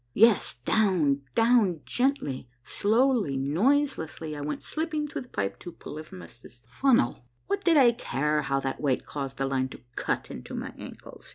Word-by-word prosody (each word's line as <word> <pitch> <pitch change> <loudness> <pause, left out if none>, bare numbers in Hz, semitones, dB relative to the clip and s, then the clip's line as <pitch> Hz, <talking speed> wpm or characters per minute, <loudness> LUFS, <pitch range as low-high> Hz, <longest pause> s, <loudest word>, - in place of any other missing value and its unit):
Yes, 225 -2 +4
down, 155 - +2
down, 225 -8 +3
gently, 245 - 0
slowly, 220 - +2
noiselessly, 160 - 0
I 145 - -6
went 145 0 -4
slipping 310 -1 -2
through - - -5
the 250 - -12
pipe 100 -1 -3
to 175 - -8
Polyphemus' 120 - -11
Funnel. 125 - +1 0.2
What 400 +1 -2
did 335 -3 +4
I 250 -4 +7
care 150 - -1
how 135 -1 0
that 135 -1 -3
weight 135 -4 0
caused 135 -2 -5
the 135 - 0
line 130 -1 0
to - - -11
cut - - -2
into 60 - -7
my - - -5
ankles - - -11
155 Hz, 160 wpm, -27 LUFS, -, 0.2 s, I